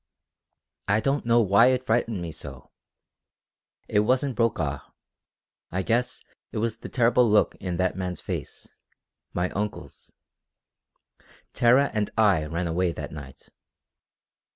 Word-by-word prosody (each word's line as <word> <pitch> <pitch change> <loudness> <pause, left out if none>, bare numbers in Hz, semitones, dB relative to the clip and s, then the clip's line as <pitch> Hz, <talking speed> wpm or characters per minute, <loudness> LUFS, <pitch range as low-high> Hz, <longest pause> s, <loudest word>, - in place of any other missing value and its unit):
I 105 +2 +3
don't 135 +1 -1
know 120 0 +5
why 105 +3 +5
it 130 0 +1
frightened 115 -5 0
me 85 - -5
so. 70 -4 -9 1.2
It 105 - +2
wasn't 130 +5 +1
Brokaw. 115 -2 0 0.9
I 95 +2 -1
guess 120 +4 -1 0.3
it - - -5
was 110 0 -2
the - - -8
terrible 120 -1 +3
look 105 0 +3
in 90 -3 -3
that 95 0 0
man's 90 -1 -4
face - - -6 0.6
my 90 +1 -1
uncle's. 105 +1 -6 1.4
Tara 130 +4 +4
and 105 -2 0
I 100 -8 +3
ran 85 +3 -2
away 85 +1 0
that - - -7
night. 70 -3 -11
105 Hz, 130 wpm, -25 LUFS, 90-120 Hz, 1.4 s, know